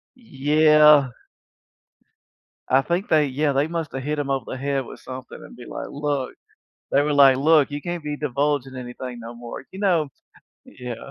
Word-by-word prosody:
Yeah. 150 - +4 1.6
I 135 +1 +4
think 175 +6 -2
they 155 -2 +3
yeah, 140 +2 0
they 140 +2 +1
must 165 -2 -4
have 135 - -5
hit 150 +3 -2
them 145 -2 -3
over 135 -1 -1
the - - -5
head 140 0 -2
with - - -11
something 130 0 -9
and - - -13
be 125 - -11
like, - - -6
"Look." 145 -2 -3 0.6
They 140 - +3
were 150 +1 0
like, 140 -2 +6
"Look, 150 +1 +4
you 145 - -4
can't 175 -1 -4
be 150 0 -4
divulging 140 -1 -1
anything 125 -1 -7
no 115 +1 -9
more," 120 0 -9
you 190 - -10
know? 175 -7 +1 0.6
Yeah. 125 -2 -9
145 Hz, 180 wpm, -23 LUFS, 130-150 Hz, 1.6 s, like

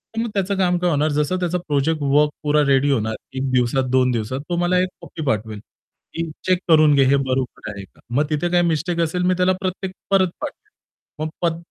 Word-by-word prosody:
तर 225 - 0
मग 235 - -2
त्याचं 200 0 0
काम 180 -2 +2
काय 175 0 +1
होणार, 150 0 +1
जसं 150 +5 0
त्याचा 180 0 0
प्रोजेक्ट 150 +2 0
वर्क 145 +2 +3
पूरा 150 0 +3
रेडी 140 +1 +3
होणार. 110 -4 0 0.2
1 130 0 -2
दिवसात, 125 +1 +2
2 130 -1 +3
दिवसात, 120 +3 -2
तो 175 - 0
मला 175 +1 +2
एक 185 - +2
कॉपी 170 -2 -7
पाठवेल, 110 -3 -2 0.5
की 165 0 -3 0.2
चेक 185 -1 +3
करून 155 -2 +6
घे, 135 - +5
हे 135 +2 +4
बरोबर 130 -4 -2
आहे 100 -1 -8
का? - - -28 0.2
मग 145 +3 +3
तिथे 155 +3 0
काही 175 0 +3
मिस्टेक 165 +2 -1
असेल, 170 +2 0
मी 180 +1 +3
त्याला 185 +1 +3
प्रत्येक 185 0 -3 0.2
परत 190 -2 +4
पाठवेल. 305 +8 -7 0.5
मग, 165 +2 -2
155 Hz, 210 wpm, -21 LUFS, 135-180 Hz, 0.5 s, करून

